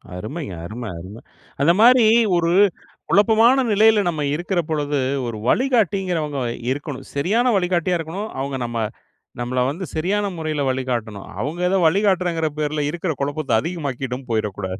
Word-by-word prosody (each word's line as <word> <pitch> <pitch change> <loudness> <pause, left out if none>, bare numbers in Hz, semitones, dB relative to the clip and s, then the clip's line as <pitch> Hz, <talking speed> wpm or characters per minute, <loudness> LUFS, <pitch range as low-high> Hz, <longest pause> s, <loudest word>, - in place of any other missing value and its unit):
அருமைங்க! 110 - -6
அரும, 120 +6 -7 0.2
அரும. 100 +6 -10 0.4
அந்த 165 +4 +5
மாரி 245 -1 +7 0.3
ஒரு 170 0 +1 0.6
குழப்பமான 225 +6 +5
நிலையில 215 +1 +5
நம்ம 155 -3 -3
இருக்கிற 175 +2 -1
பொழுது, 145 -2 -1 0.3
ஒரு 115 -2 -5
வழிகாட்டிங்கறவங்க 190 - +1 0.3
இருக்கணும். 140 -1 -5
சரியான 225 - +2
வழிகாட்டியா 180 -1 +1
இருக்கணும். 190 +7 -5
அவங்க 135 0 -3
நம்ம 115 -2 -2 0.5
நம்மள 125 +1 -2
வந்து 175 +6 -5
சரியான 200 +6 0
முறையில 155 -2 -2
வழிகாட்டணும். 120 -6 -3
அவங்க 150 +9 -3
ஏதோ 190 0 +2
வழிகாட்றேன்ற 180 -3 +1
பேர்ல 150 0 -1
இருக்குற 175 0 -2
குழப்பத்த 145 -1 -2
அதிகமாக்கிட்டும் 135 -6 -4
போய்றக்கூடாது. 100 -4 -2
155 Hz, 130 wpm, -21 LUFS, 130-190 Hz, 0.6 s, மாரி